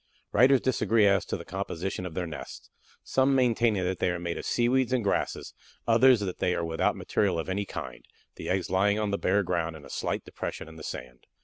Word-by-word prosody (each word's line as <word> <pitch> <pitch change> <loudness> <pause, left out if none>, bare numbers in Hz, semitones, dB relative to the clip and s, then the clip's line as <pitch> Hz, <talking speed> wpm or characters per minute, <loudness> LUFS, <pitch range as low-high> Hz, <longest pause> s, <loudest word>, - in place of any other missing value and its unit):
Writers 130 +1 +5
disagree 115 -3 +2
as 100 -1 +3
to - - -3
the - - -10
composition 90 +2 -4
of 80 - -10
their 90 - -1
nests, 80 -3 -9 0.3
some 135 +1 +2
maintaining 115 -5 +2
that 90 0 -2
they - - +2
are 90 - -1
made 85 -1 -3
of - - -5
seaweeds 125 +1 +2
and 125 -3 +1
grasses, 100 - -1 0.3
others 120 0 +6
that 95 -3 -4
they 90 - +1
are 85 - -1
without 80 0 0
material 100 -5 0
of 80 - -3
any 100 +2 -1
kind, - - -7 0.3
the - - -7
eggs 95 -1 -1
lying 100 +2 +3
upon 105 -1 -1
the 100 - -1
bare 100 +2 +2
ground 85 -3 -1
in 75 -2 -12
a 70 - -11
slight - - -2
depression - - -6
in 80 - -12
the 80 - -11
sand. 65 -4 -8
95 Hz, 220 wpm, -28 LUFS, 85-115 Hz, 0.3 s, others